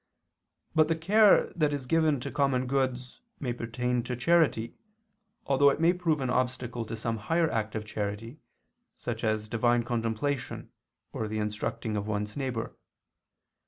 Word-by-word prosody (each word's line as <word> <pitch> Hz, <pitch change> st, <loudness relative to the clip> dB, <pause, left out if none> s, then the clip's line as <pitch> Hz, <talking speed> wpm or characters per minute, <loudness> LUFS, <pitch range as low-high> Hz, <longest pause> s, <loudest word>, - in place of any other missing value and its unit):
But 155 Hz, -1 st, +4 dB
the 165 Hz, -, +1 dB
care 200 Hz, +6 st, +4 dB
that 155 Hz, -3 st, +2 dB
is 140 Hz, -3 st, -3 dB
given 155 Hz, 0 st, +2 dB
to -, -, -5 dB
common 135 Hz, -3 st, +1 dB
goods 130 Hz, -, -2 dB, 0.2 s
may 125 Hz, -4 st, -2 dB
pertain 125 Hz, +1 st, -1 dB
to 125 Hz, -, -3 dB
charity, 130 Hz, -4 st, +2 dB, 0.7 s
although 140 Hz, +1 st, +5 dB
it 140 Hz, -, -1 dB
may 165 Hz, +2 st, +4 dB
prove 165 Hz, -5 st, 0 dB
an 130 Hz, -, -1 dB
obstacle 125 Hz, -2 st, -1 dB
to 115 Hz, -, -5 dB
some 115 Hz, 0 st, -2 dB
higher 165 Hz, +9 st, +1 dB
act 110 Hz, -1 st, -2 dB
of 110 Hz, -1 st, -3 dB
charity, 105 Hz, +5 st, -4 dB, 0.6 s
such -, -, -5 dB
as 110 Hz, -1 st, 0 dB
divine 120 Hz, +2 st, +2 dB
contemplation 120 Hz, +3 st, -2 dB, 0.4 s
or 110 Hz, -, -2 dB
the 110 Hz, +1 st, -3 dB
instructing 110 Hz, +1 st, -2 dB
of 105 Hz, 0 st, -2 dB
one's 105 Hz, 0 st, -2 dB
neighbor. 130 Hz, -5 st, -3 dB
125 Hz, 155 wpm, -29 LUFS, 110-145 Hz, 0.7 s, although